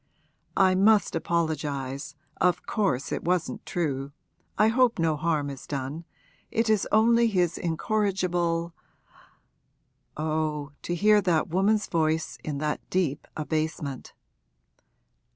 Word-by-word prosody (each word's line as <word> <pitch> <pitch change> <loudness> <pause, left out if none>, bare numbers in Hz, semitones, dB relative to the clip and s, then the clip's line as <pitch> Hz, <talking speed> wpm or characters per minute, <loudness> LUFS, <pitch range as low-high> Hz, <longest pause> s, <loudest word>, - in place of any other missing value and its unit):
'I 190 -1 +5
must 210 -2 +4
apologise, 150 -4 -2 0.2
of 180 0 +1
course 185 - -1
it - - -2
wasn't 180 -1 -1
true, 140 -5 -2 0.5
I 215 +2 +5
hope 245 0 +3
no 165 -2 +1
harm 150 -2 -1
is 135 - -10
done, 140 +4 -4 0.4
it 225 -1 +1
is 215 -3 +2
only 230 +2 +5
his 180 -6 +1
incorrigible 175 -2 0 0.7
' - - -32
Oh, 155 -2 -2
to 175 - -3
hear 210 +3 +5
that 170 -5 +1
woman's 200 +5 +2
voice 160 -1 -1
in 150 -2 -3
that 150 +1 -2
deep 165 -6 -1
abasement! 155 -3 -3
165 Hz, 115 wpm, -27 LUFS, 150-195 Hz, 0.7 s, I